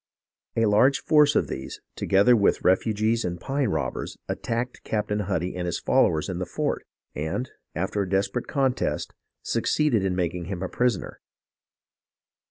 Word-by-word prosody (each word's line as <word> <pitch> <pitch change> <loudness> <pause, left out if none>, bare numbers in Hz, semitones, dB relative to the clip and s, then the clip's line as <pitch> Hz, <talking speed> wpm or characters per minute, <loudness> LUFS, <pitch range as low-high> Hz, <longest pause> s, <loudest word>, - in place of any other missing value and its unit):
A 115 - +3
large 110 +7 +4
force 150 -1 +4
of - - +2
these, 65 - -6 0.2
together 100 +6 +4
with 100 -3 +2
refugees 110 +4 +2
and 90 -1 -3
pine 135 +1 -1
robbers, 70 -8 -3
attacked 120 +2 -3
Captain 105 -1 -1
Huddy 90 -3 -2
and 90 -1 -3
his 85 - -1
followers 80 -1 +2
in 90 -2 -3
the 90 - -2
fort, - - -2 0.3
and, 80 - -3 0.2
after 95 +4 -1
a 95 - -3
desperate 95 +1 0
contest, 135 -3 0 0.3
succeeded 145 -10 +1
in 95 -2 0
making 90 -1 -2
him 95 0 -4
a 95 - -3
prisoner. 120 -6 -1
100 Hz, 150 wpm, -25 LUFS, 90-120 Hz, 0.3 s, large